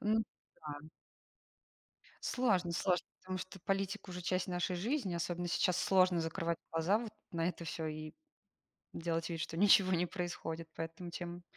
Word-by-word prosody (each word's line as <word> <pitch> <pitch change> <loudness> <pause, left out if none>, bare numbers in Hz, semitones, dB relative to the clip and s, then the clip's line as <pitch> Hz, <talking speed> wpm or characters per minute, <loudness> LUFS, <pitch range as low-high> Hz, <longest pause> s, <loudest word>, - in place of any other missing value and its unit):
Ну 215 +1 +3 0.4
да. 150 0 -7 1.3
Сложно, 195 -9 +2
сложно, 180 +1 +1
потому 185 0 -4
что 185 +1 -7
политика 195 0 -1
уже 180 0 -5
часть 185 +1 +1
нашей 180 0 0
жизни. 215 - 0
Особенно 175 +1 -1
сейчас 180 +1 +3
сложно 185 -3 +4
закрывать 165 +1 -1
глаза 170 +6 +3
вот 230 -2 -5 0.2
на 165 +1 +1
это 170 -1 -4
всё, 160 0 -3
и 155 0 -4 0.8
делать 165 0 -1
вид, 165 -1 -3
что 165 +1 -3
ничего 195 -1 +7
не 175 0 +3
происходит. 165 -2 -4
Поэтому, 165 +2 -5
чем 175 0 -5
175 Hz, 150 wpm, -35 LUFS, 165-190 Hz, 1.3 s, ничего